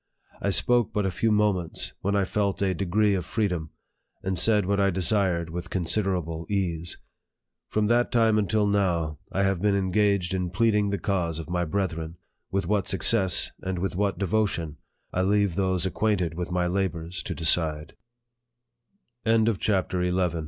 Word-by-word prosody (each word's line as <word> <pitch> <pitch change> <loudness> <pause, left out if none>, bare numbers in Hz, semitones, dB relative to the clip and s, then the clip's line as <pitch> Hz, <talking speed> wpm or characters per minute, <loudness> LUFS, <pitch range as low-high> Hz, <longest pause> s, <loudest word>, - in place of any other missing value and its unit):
I 100 - 0
spoke 120 +3 +2
but 105 -1 0
a 95 - 0
few 110 +5 0
moments, 105 -5 0
when 100 +1 0
I 100 - +3
felt 100 0 -1
a 95 -1 +1
degree 100 +3 +1
of 95 -2 -1
freedom, 90 -5 -2 0.5
and 95 -2 -1
said 105 -1 +3
what 100 +1 0
I 100 0 +3
desired 90 -2 +1
with 90 +1 -5
considerable 90 -3 -1
ease. 85 -4 -1 0.7
From 105 0 0
that 120 +3 +2
time 110 -2 +3
until 105 +1 +1
now, 85 -7 0
I 100 - 0
have 95 -3 0
been 105 -1 +2
engaged 100 -1 +1
in 90 -1 -1
pleading 105 +2 +2
the 100 - -1
cause 85 -4 -1
of 80 0 -7
my 90 0 0
brethren 85 -2 -3 0.3
with 95 -1 -1
what 100 +1 0
success, 95 -2 +3
and 95 -1 -3
with 90 0 -2
what 100 +1 0
devotion, 95 -6 -1 0.4
I 95 - +1
leave 100 -1 +2
those 95 -1 0
acquainted 95 -4 0
with 90 +1 -4
95 Hz, 145 wpm, -26 LUFS, 90-105 Hz, 0.7 s, I